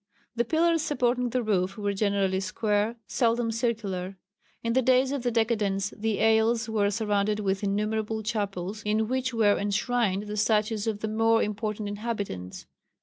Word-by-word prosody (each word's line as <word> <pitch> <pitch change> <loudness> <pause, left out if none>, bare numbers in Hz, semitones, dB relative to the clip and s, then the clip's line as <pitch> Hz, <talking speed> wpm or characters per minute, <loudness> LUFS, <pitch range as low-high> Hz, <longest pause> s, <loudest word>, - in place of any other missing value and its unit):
The 235 0 +1
pillars 330 +4 +2
supporting 250 -4 0
the 250 +1 -1
roof 195 -2 0
were 205 -1 -1
generally 195 -2 +1
square, 210 +3 0
seldom 230 0 +1
circular. 205 -5 -2 0.5
In 230 0 0
the 260 - +3
days 260 +1 +3
of 280 -2 -2
the 245 - 0
decadence 210 -4 0
the 220 -1 -1
aisles 225 +1 +3
were 210 -2 +1
surrounded 210 0 0
with 195 0 -1
innumerable 215 +2 -1
chapels 205 -2 -3
in 215 +1 0
which 260 +1 -1
were 220 -3 +3
enshrined 205 0 0
the 210 0 -5
statues 215 0 +1
of 210 -2 -2
the 220 - -1
more 225 +1 +3
important 210 0 -3
inhabitants. 205 - -5
215 Hz, 155 wpm, -27 LUFS, 205-230 Hz, 0.5 s, the